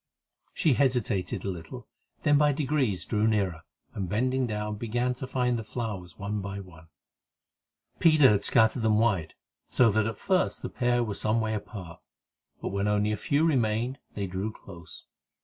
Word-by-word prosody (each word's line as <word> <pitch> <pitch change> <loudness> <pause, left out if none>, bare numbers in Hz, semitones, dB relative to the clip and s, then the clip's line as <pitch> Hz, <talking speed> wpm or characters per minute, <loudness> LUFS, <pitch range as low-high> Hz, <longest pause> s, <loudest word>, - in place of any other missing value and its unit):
She 155 - +3
hesitated 120 -10 0
a - - -1
little, 85 -3 -9 0.4
then 145 - +4
by 150 -1 +4
degrees 135 - 0
drew 105 0 +1
nearer, 95 -7 0 0.3
and, 95 -3 -4
bending 125 +4 +1
down, 105 -1 -3
began 120 +3 -1
to 130 +1 -7
find 125 -2 0
the - - -5
flowers 105 -6 -5
one 105 0 -3
by 100 0 -5
one. 85 -4 -13 1.1
Peter 155 -5 +6
had 100 -1 +1
scattered 110 +1 +4
them 110 -1 +3
wide, 100 -8 +1 0.3
so 120 -3 +4
that 110 +1 +1
at 110 - -4
first 185 -1 0
the - - -3
pair 120 -1 +1
were 110 -3 -3
some 110 +3 0
way 110 -1 -1
apart, 100 -5 -7 0.6
but - - -1
when 100 +1 -1
only 105 0 +2
a - - +1
few 145 +9 +1
remained, 125 -2 +1 0.2
they 100 - -2
drew 95 +4 -3
close. 85 -6 -11
110 Hz, 170 wpm, -28 LUFS, 100-125 Hz, 1.1 s, Peter